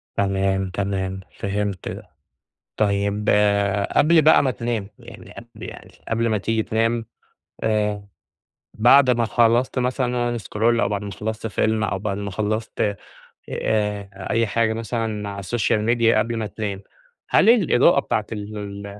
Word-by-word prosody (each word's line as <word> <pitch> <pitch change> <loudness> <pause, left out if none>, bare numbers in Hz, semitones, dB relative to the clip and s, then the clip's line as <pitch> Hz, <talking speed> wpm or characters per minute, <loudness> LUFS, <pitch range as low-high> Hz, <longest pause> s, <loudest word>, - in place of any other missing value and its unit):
تمام، 95 -1 0
تمام، 95 0 -3 0.2
فهمت 100 -1 -3
ده، - - -8 0.7
طيب 100 0 0 0.6
قبل 165 +1 +5
بقى 155 -1 +6
ما 130 - +1
تنام، 115 -3 -3
يعني 120 -2 -13
قبل 120 0 -12
يعني - - -13 0.2
قبل 115 +1 0
ما 110 - +1
تيجي 110 +2 -1
تنام، 115 +1 0 0.6
آآ، 105 -2 0 0.7
بعد 125 +4 +5
ما 120 -1 +1
خلصت 120 +3 +2
مثلًا 125 -1 -1
scroll 115 +2 0
أو - - +1
بعد 100 -2 -2
ما 100 - -6
خلصت 110 +3 -4
فيلم 110 +1 0
أو 100 -2 -1
بعد 100 0 -3
ما 100 -1 -4
خلصت 105 0 -2 0.5
آآ، 105 -2 -1 0.2
أي 115 0 +2
حاجة 110 +1 +1
مثلًا 110 -2 -3
على 100 0 -6
الsocial 110 +1 0 0.2
media 115 -1 +4
قبل 115 +2 0
ما 110 -1 -2
تنام، 105 -2 -5 0.5
هل - - +4
الإضاءة 175 - +4
بتاعة 105 -6 -2
ال 105 0 -6
ال 100 0 -7
110 Hz, 145 wpm, -22 LUFS, 100-115 Hz, 0.7 s, بقى